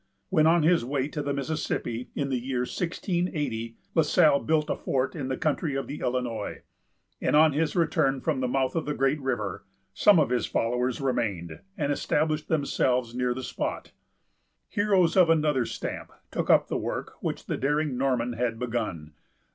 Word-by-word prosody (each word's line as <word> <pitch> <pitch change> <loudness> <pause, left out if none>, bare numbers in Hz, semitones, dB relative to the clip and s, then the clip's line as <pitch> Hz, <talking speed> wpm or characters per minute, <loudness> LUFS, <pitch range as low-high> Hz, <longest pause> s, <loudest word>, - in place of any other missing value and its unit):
When 160 -4 +4
on 165 0 +4
his 170 -3 +4
way 135 +2 -1
to 150 - -4
the 145 0 -2
Mississippi, 140 -4 -3
in 140 -1 -1
the 130 -2 0
year 125 0 -2
1680, 155 - -2 0.2
La 160 - +4
Salle 150 -2 +4
built 155 -1 +1
a - - 0
fort 130 +3 -1
in 140 -5 -3
the 130 - -2
country 155 -3 -1
of 135 - -2
the 145 - -6
Illinois; 120 -4 -3 0.6
and, - - +2
on 155 0 +6
his 155 +2 0
return 145 -5 +2
from 150 -1 -1
the 130 - 0
mouth 130 +2 0
of 165 - -1
the 150 - -1
great 135 +2 +1
river, 115 -9 -2 0.3
some 200 - +5
of 145 -5 +2
his 125 - +1
followers 125 +3 0
remained, 100 -11 -2 0.2
and 145 -4 0
established 155 +1 0
themselves 125 -5 +1
near 125 0 0
the 130 - -5
spot. - - -4 0.8
Heroes 195 -5 +2
of 180 -3 +6
another 150 -6 +2
stamp - - -5 0.2
took - - -2
up - - +5
the - - -1
work - - -4
which - - -3
the - - -2
daring 150 0 0
Norman 125 -2 0
had 115 -1 -1
begun. 110 -11 -3
135 Hz, 180 wpm, -27 LUFS, 125-155 Hz, 0.8 s, on